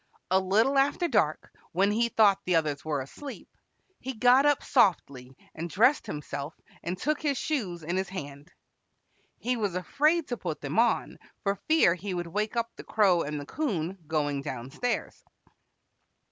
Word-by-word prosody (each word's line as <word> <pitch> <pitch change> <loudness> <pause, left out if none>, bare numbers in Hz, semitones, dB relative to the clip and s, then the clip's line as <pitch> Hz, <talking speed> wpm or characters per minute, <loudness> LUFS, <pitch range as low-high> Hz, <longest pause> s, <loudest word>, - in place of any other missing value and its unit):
A 190 - +5
little 220 +9 +3
after 285 +5 +2
dark, 205 - 0 0.2
when 195 +4 +3
he 235 +2 +1
thought 205 -4 +4
the 180 - +1
others 150 -3 0
were 150 -3 -1
asleep, 270 - -9 0.5
he 260 0 -5
got 250 +5 +5
up 290 -2 +2
softly 140 - +1 0.2
and 170 +2 -5
dressed 245 - +3
himself 145 0 -5 0.3
and 180 +2 -4
took 300 +8 -1
his 290 -4 0
shoes 195 - -2
in 170 +4 -2
his 190 0 -2
hand. 145 -3 -8 0.9
He 250 +1 -1
was 205 -5 -1
afraid 300 - +1
to 245 - -2
put 165 -7 -4
them 145 +9 -1
on, 235 +1 +1 0.2
for 200 -2 +2
fear 315 - +5
he 185 +2 -5
would 175 0 -3
wake 210 +7 -2
up 230 0 -1
the - - -10
Crow 195 -6 +3
and 150 -1 -3
the 145 - -7
'Coon 190 - -3
going 145 -3 -1
down 135 -3 -6
stairs. 245 - -3
190 Hz, 170 wpm, -28 LUFS, 155-245 Hz, 0.9 s, A